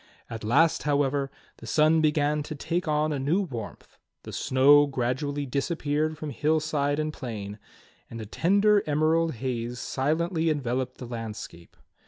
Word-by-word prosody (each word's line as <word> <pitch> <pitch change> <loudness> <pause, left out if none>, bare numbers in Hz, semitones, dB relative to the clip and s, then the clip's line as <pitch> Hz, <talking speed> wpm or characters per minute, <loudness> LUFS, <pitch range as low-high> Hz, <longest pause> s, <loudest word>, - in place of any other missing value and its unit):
At 115 -1 -6
last, 145 +9 +3
however, 140 -1 0 0.3
the 115 - -11
sun 155 +6 +4
began 150 -1 +2
to 150 +1 -6
take 170 +4 -2
on 150 0 +1
a 140 - -2
new 145 +8 +1
warmth, 120 - -8 0.2
the - - -9
snow 145 +3 +5
gradually 140 +2 -2
disappeared 150 +2 -1
from 155 -1 -5
hillside 150 0 0
and 155 0 -2
plain, 105 -6 -6 0.5
and 115 - -8
a 110 - -6
tender 200 - +3
emerald 155 +1 +2
haze 120 0 -3
silently 160 +6 0
enveloped 130 -3 -2
the 125 - -8
landscape. 110 -7 -8
145 Hz, 145 wpm, -26 LUFS, 125-155 Hz, 0.5 s, snow